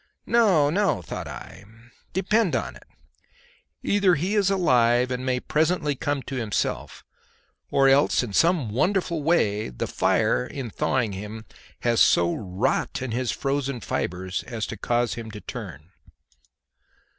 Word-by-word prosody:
No, 190 -11 +4
no, 195 - +1
thought - - -6
I! 95 - -9 0.5
depend 195 0 +1
upon - - -3
it, - - -16 1.0
either 195 -3 +3
he 180 +7 -1
is 205 -3 +3
alive 125 -9 +3
and 125 0 -3
may 130 -1 0
presently 155 +1 +1
come 145 0 -2
to 135 - -5
himself, 110 -5 -2 0.7
or 135 0 +4
else 135 0 +4
in 110 -5 -6
some 165 - +2
wonderful 170 - 0
way 110 - +1
the - - -4
fire 60 - +1
in 125 - -6
thawing 125 -2 0
him 105 +3 -7 0.4
has 120 -1 +2
so 85 0 +4
wrought 95 +5 -1
in 130 - -4
his 120 0 -1
frozen 140 -1 -2
fibres 95 -2 -3
as 115 -3 -3
to - - -6
cause 120 +3 0
him 115 -1 -7
to 105 -1 -8
turn. 75 -3 -8
130 Hz, 145 wpm, -25 LUFS, 110-165 Hz, 1.0 s, No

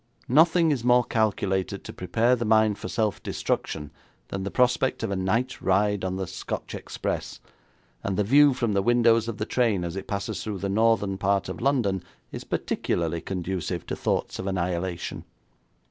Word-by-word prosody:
Nothing 165 +4 +5
is 130 -5 -1
more 125 0 +5
calculated 100 -4 0
to - - -8
prepare 115 +7 +2
the 120 - -3
mind 110 -1 +3
for - - -5
self 110 -3 -1
destruction 75 -1 -3 0.4
than 95 - -4
the 100 - -3
prospect 125 +3 +1
of - - -1
a - - 0
night 95 +7 -1
ride 100 +1 +2
on 95 0 -1
the 95 0 -2
Scotch - - -5
express, - - -4 0.6
and 95 -2 -2
the 105 - +3
view 140 +5 +5
from 120 -4 0
the 100 - +2
windows 115 0 +3
of 115 - -4
the 105 - -2
train 115 -7 +1
as 85 0 -4
it 95 - -6
passes 100 -1 -3
through 105 -2 -4
the 100 +1 -3
northern 105 -2 +2
part 100 0 +1
of - - -6
London 120 -8 +1 0.3
is - - -6
particularly 85 -1 -1
conducive 90 -2 -3
to - - -3
thoughts - - -1
of 95 - -4
annihilation.' 90 -1 -2
100 Hz, 175 wpm, -26 LUFS, 95-120 Hz, 0.6 s, Nothing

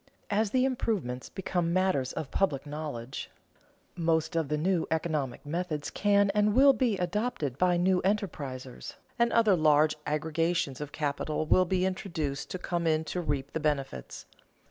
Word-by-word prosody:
As 210 +1 +2
the 255 +4 +2
improvements 205 - -2
become 175 -3 -1
matters 185 -9 +1
of 155 -4 -5
public 150 -9 0
knowledge, 145 -4 -5 0.7
most 160 -2 0
of 165 -3 +1
the 150 - 0
new 175 +2 +1
economic 155 -6 -2
methods 155 -1 -3
can 200 -1 +3
and 210 +1 +2
will 275 +1 +7
be 245 -6 +1
adopted 180 - -1
by 180 -1 +3
new 180 +1 +2
enterprisers, 155 - -3 0.2
and 235 0 +3
other 220 -4 +4
large 155 -1 +4
aggregations 155 -1 0
of 145 -1 -5
capital 150 +1 -2
will 185 +4 +4
be 185 +1 +1
induced 160 -7 -3
to - - -3
come 175 -2 -2
in 155 0 +2
to 175 +3 -3
reap 140 -4 -2
the - - -1
benefits. 140 - -3
165 Hz, 155 wpm, -29 LUFS, 150-190 Hz, 0.7 s, will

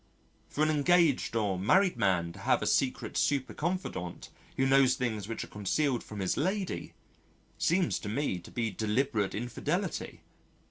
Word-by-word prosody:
For 150 - 0
an 155 - +3
engaged 155 -4 +3
or 100 -5 0
married 185 - +3
man 90 -4 +1
to - - -12
have - - +2
a - - -1
secret - - 0
super 140 -2 +1
confidante 170 - -4 0.3
who 135 - +2
knows 135 -1 +5
things 110 -5 -2
which 115 - -4
are - - -9
concealed 120 +6 -1
from 105 -2 -7
his 95 - 0
lady 190 +4 -2 0.6
seems 175 +1 +2
to 105 - -6
me 115 -5 -1
to 85 - -13
be 115 -2 -2
deliberate 110 -1 0
infidelity. 120 +2 -3
125 Hz, 155 wpm, -30 LUFS, 105-150 Hz, 0.6 s, knows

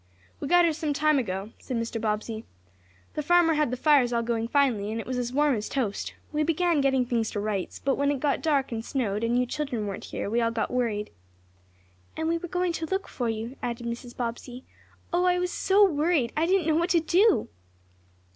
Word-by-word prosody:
"We - - -4
got 350 +2 +5
here 330 - +2
some 305 -1 -2
time 305 0 +3
ago," 195 -2 -4
said 255 - -4
Mr. 230 0 -3
Bobbsey. 220 +1 -2 0.7
"The 300 - -2
farmer 345 +1 +4
had 300 -3 +1
the 255 - -3
fires 275 -3 +4
all 235 -1 +1
going 230 -1 -1
finely, 235 -7 +1
and 225 - -3
it - - -5
was 255 -1 -2
as 245 -1 -2
warm 290 +2 +3
as 215 -3 -3
toast. 230 -8 -2 0.2
We 305 0 0
began 330 0 +2
getting 265 -2 +2
things 230 -2 0
to 205 - -3
rights, 205 -3 -3
but 275 0 0
when 280 0 +2
it 285 -2 0
got 285 0 0
dark, 285 -5 +1
and 225 -1 -3
snowed, 225 -5 -2
and 235 +1 +1
you 250 - +2
children 250 -4 -3
weren't 200 -2 -5
here, - - -4
we 230 +3 +1
all 230 - +2
got 230 -1 -2
worried." 225 -4 -1 1.1
"And 320 0 -1
we 335 +1 +1
were 350 - -6
going 360 0 -1
to 325 -1 -3
look 385 +2 -2
for 240 -3 -3
you," 225 +4 -4
added 240 0 -4
Mrs. 240 +1 -6
Bobbsey. 245 +1 -5 0.5
"Oh, 355 +1 +2
I 360 0 +3
was 360 0 -1
so 400 +1 +4
worried 300 -6 +1
I 320 +2 +1
didn't 375 -2 +2
know 315 -1 +2
what 340 +2 +1
to 345 - +4
do!" 370 +6 +3
265 Hz, 220 wpm, -27 LUFS, 230-320 Hz, 1.1 s, got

